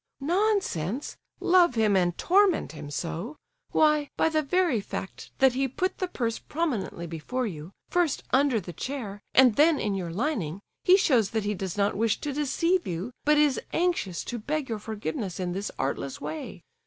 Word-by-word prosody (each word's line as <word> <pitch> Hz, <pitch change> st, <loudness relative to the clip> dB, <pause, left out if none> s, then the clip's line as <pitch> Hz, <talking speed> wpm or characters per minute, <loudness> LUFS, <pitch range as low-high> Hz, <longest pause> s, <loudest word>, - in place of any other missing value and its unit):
"Nonsense! 295 Hz, -, 0 dB, 0.2 s
love 350 Hz, -7 st, +4 dB
him 215 Hz, -3 st, +3 dB
and 175 Hz, -2 st, +2 dB
torment 380 Hz, -1 st, +3 dB
him 150 Hz, -2 st, -8 dB
so! 170 Hz, -, -4 dB, 0.4 s
Why, 300 Hz, -2 st, +3 dB
by -, -, +3 dB
the 310 Hz, -1 st, +1 dB
very 310 Hz, -, +1 dB
fact 190 Hz, -, -7 dB
that 265 Hz, -1 st, +5 dB
he 270 Hz, +1 st, +1 dB
put 365 Hz, +9 st, -2 dB
the 370 Hz, -, 0 dB
purse 230 Hz, -9 st, -2 dB
prominently 265 Hz, -, -3 dB
before 170 Hz, +11 st, -3 dB
you, 165 Hz, -4 st, -6 dB, 0.2 s
first 350 Hz, -5 st, +1 dB
under 265 Hz, -3 st, +4 dB
the 175 Hz, -2 st, -8 dB
chair 210 Hz, -, -5 dB
and 255 Hz, -4 st, +6 dB
then 305 Hz, 0 st, +5 dB
in 205 Hz, -, -1 dB
your 185 Hz, -3 st, -3 dB
lining, 195 Hz, -, -2 dB, 0.2 s
he 370 Hz, +1 st, +7 dB
shows 250 Hz, -, +3 dB
that 220 Hz, -2 st, -1 dB
he 210 Hz, -, 0 dB
does 190 Hz, -1 st, -5 dB
not 200 Hz, 0 st, +2 dB
wish 225 Hz, +1 st, +1 dB
to 290 Hz, -, -3 dB
deceive 335 Hz, +5 st, +1 dB
you, 180 Hz, +7 st, -3 dB
but 300 Hz, 0 st, +5 dB
is 295 Hz, -3 st, +3 dB
anxious 330 Hz, -, 0 dB
to 240 Hz, -, -5 dB
beg 290 Hz, +4 st, -2 dB
your 220 Hz, -2 st, -2 dB
forgiveness 205 Hz, -3 st, -4 dB
in 180 Hz, -1 st, -2 dB
this 195 Hz, +3 st, -3 dB
artless 135 Hz, 0 st, -3 dB
way. 155 Hz, +2 st, -6 dB
235 Hz, 180 wpm, -27 LUFS, 190-305 Hz, 0.4 s, he